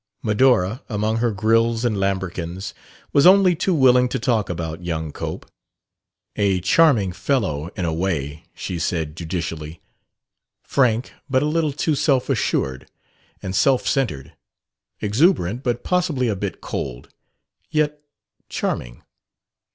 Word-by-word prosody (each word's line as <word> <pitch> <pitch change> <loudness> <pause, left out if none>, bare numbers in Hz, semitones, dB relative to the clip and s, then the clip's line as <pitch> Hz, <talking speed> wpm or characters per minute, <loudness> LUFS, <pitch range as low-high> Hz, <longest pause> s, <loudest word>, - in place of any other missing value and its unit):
Medora, 110 -1 +2
among 110 0 0
her 120 +1 +1
grilles 115 +3 +2
and 115 -3 +1
lambrequins, 95 -1 -3 0.4
was 140 +3 +6
only 190 -2 +6
too 180 +2 0
willing 125 -3 +5
to 135 - -1
talk 115 -4 0
about 80 0 -4
young 80 -3 -3
Cope. - - -6 0.9
"A 100 -3 +2
charming 105 - +4
fellow 90 - -1
in 95 - -2
a 80 - -1
way," 80 -4 -2
she 90 - -4
said 80 -3 -2
judicially. 80 -2 -5 0.8
"Frank, 125 -3 +1 0.2
but 130 +1 +2
a - - +1
little 155 0 +1
too 150 +3 0
self 135 -3 +1
assured 65 0 -1 0.5
and 95 0 -4
self 130 +5 +3
centered. 105 - -1 0.7
Exuberant, 115 - +2
but 120 -3 -2
possibly 170 -9 0
a 105 - 0
bit 95 -2 -5
cold. - - -5 0.6
Yet 150 -1 0 0.5
charming." - - -3
105 Hz, 130 wpm, -22 LUFS, 85-130 Hz, 0.9 s, was